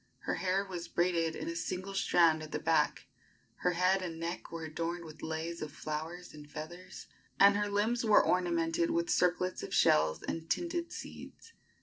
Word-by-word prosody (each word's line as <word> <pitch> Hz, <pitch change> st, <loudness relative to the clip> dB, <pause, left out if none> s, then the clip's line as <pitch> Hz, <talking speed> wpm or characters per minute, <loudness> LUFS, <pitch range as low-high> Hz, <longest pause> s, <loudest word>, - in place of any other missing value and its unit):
Her -, -, -2 dB
hair 190 Hz, +1 st, 0 dB
was 175 Hz, -3 st, -6 dB
braided 170 Hz, -2 st, +1 dB
in -, -, -5 dB
a 170 Hz, -, -3 dB
single 185 Hz, +3 st, -4 dB
strand 165 Hz, -4 st, +4 dB
at 155 Hz, 0 st, -8 dB
the -, -, -1 dB
back; -, -, +1 dB, 0.5 s
her 180 Hz, -, +1 dB
head 185 Hz, +2 st, +3 dB
and 165 Hz, -3 st, -5 dB
neck 170 Hz, +1 st, -5 dB
were 165 Hz, -1 st, -5 dB
adorned 170 Hz, +2 st, -3 dB
with 155 Hz, -1 st, -11 dB
leis 160 Hz, +1 st, -4 dB
of 155 Hz, -, -4 dB
flowers 155 Hz, +4 st, -5 dB
and 150 Hz, -1 st, -12 dB
feathers, 165 Hz, +5 st, -8 dB, 0.3 s
and 200 Hz, 0 st, +8 dB
her 205 Hz, 0 st, 0 dB
limbs 220 Hz, +4 st, +1 dB
were 215 Hz, -2 st, +5 dB
ornamented 170 Hz, -2 st, +1 dB
with 170 Hz, 0 st, 0 dB
circlets 180 Hz, +1 st, +1 dB
of -, -, -4 dB
shells 80 Hz, 0 st, +4 dB
and 165 Hz, 0 st, -4 dB
tinted 340 Hz, 0 st, -1 dB
seeds. 460 Hz, -, -10 dB
170 Hz, 180 wpm, -32 LUFS, 160-185 Hz, 0.5 s, and